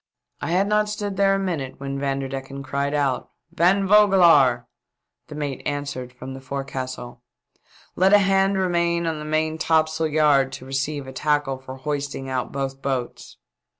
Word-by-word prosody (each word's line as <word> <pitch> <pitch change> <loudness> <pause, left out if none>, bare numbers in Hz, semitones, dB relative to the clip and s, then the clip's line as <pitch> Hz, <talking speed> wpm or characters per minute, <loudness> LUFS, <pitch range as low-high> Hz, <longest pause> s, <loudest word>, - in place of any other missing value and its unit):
I - - -3
had 185 +4 +2
not 210 0 +2
stood 205 -1 -4
there 195 0 +3
a - - -1
minute 155 -9 -3
when 140 0 -4
Van 135 -1 -1
derdecken 135 0 -6
cried 140 +2 -2
out, 140 -3 0 0.2
"Van 190 +4 +2
Vogelaar!" 170 - +5 0.6
The 150 - -9
mate 145 -3 -4
answered 140 -3 -4
from 130 +1 -9
the 135 - -9
forecastle. 130 -2 -6 0.4
•' - - -48 0.4
Let 190 +2 +4
a 205 - +8
hand 195 0 +2
remain 170 -2 +1
on 160 -2 -2
the 150 - -7
main 155 +1 -1
topsail 160 0 +1
yard 145 -3 +3
to 135 -1 -8
receive 135 +2 -3
a 130 - -9
tackle 145 -2 0
for 130 0 -9
hoisting 140 -1 -4
out 130 -1 -2
both 135 0 -4
boats." 130 -3 -4
145 Hz, 170 wpm, -23 LUFS, 135-170 Hz, 0.6 s, a